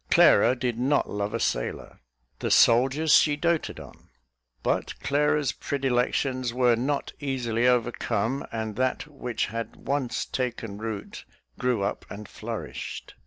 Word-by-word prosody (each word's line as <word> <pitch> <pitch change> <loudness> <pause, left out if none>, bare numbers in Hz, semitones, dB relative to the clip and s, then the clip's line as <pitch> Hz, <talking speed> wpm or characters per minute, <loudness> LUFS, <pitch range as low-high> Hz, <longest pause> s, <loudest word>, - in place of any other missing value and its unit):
Clara 125 - +6
did 120 -2 -2
not 140 +3 +1
love 105 0 -2
a - - -2
sailor. - - -2 0.4
The - - -2
soldiers 135 +6 +5
she 150 -2 +6
doated 170 +1 -1
on. - - -14 0.5
But - - -1
Clara's 145 -1 +1
predilections 130 -2 -1
were 125 -2 +4
not 140 +5 -2
easily 125 -4 0
overcome, 120 0 0
and 110 -2 -3
that 130 0 0
which 130 -6 -3
had 115 0 -5
once 135 -3 -2
taken 115 -5 -4
root 110 -2 -6 0.4
grew 125 -5 +1
up 100 - -3
and 105 0 -8
flourished. - - -6
125 Hz, 130 wpm, -26 LUFS, 115-140 Hz, 0.5 s, Clara